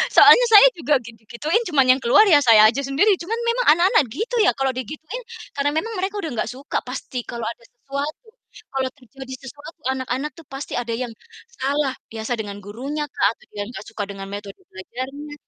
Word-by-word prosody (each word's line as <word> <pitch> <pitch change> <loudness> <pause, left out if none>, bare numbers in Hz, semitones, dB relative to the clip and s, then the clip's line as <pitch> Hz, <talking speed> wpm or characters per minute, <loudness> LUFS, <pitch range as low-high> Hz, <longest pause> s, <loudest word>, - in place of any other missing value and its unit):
Soalnya - - +8
saya 425 +4 +10
juga 320 -8 -1
gitu-gituin 235 - -2
cuman 285 -6 +3
yang - - -6
keluar 255 - +6
ya 295 - +8
saya 225 -5 +7
aja 250 - -4
sendiri. 275 +10 +3
Cuman 370 +7 -3
memang 470 +1 0
anak-anak 345 -4 +4
gitu 440 - -4
ya - - +5
kalau 270 -1 0
digituin, 305 - -6 0.3
karena 285 0 0
memang 450 +9 -2
mereka 385 +2 -2
udah 320 - -4
nggak 230 -2 -2
suka 270 +4 -3
pasti 250 -1 -6
kalau 235 -1 -6
ada 230 +1 -5
sesuatu, 280 - -6 0.4
kalau 265 -1 -1
terjadi 260 0 -11
sesuatu 290 +5 -11
anak-anak 265 +2 -3
tuh 330 -4 -14
pasti 270 +1 -7
ada 235 -1 -3
yang 245 0 -4 0.5
salah, 280 +1 0 0.2
biasa 225 +2 -3
dengan 205 -2 -5
gurunyakah 270 +7 -3
atau - - -23
dia 205 -1 -4
nggak 215 -4 -8
suka 220 -2 -4
dengan 195 -1 -8
metode 205 - -8
belajarnya. 260 +9 -7
270 Hz, 180 wpm, -22 LUFS, 235-305 Hz, 0.5 s, saya